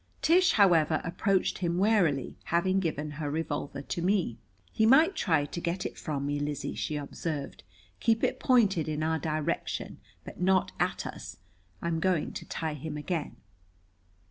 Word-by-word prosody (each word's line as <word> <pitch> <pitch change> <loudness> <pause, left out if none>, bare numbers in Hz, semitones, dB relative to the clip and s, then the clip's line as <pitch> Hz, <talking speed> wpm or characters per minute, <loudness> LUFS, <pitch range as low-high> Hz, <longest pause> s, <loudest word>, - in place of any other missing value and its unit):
Tish, 350 +2 +5
however, 165 -6 +4
approached 185 +3 0
him 175 -2 0
warily, 180 - +2
having 185 +3 +2
given 155 -4 -2
her 145 0 -4
revolver 145 -2 -3
to 170 - -4
me. 180 - 0 0.3
"He 220 - +2
might 315 - +6
try 160 -6 +2
to 170 +4 -6
get 175 +2 -2
it - - -4
from 145 -3 -3
me, 145 0 -1
Lizzie," 145 0 -3
she 155 - -3
observed. 145 0 -4 0.4
"Keep 225 0 +2
it - - +1
pointed 205 - +3
in 155 0 -2
our 160 0 0
direction, 155 +2 -3 0.2
but - - -10
not 185 0 +3
at - - 0
us. - - -7 0.5
I'm 170 -1 0
going 180 -3 0
to - - -7
tie 160 -2 -3
him 150 +1 -6
again." 155 +1 -3
165 Hz, 160 wpm, -29 LUFS, 150-190 Hz, 0.5 s, might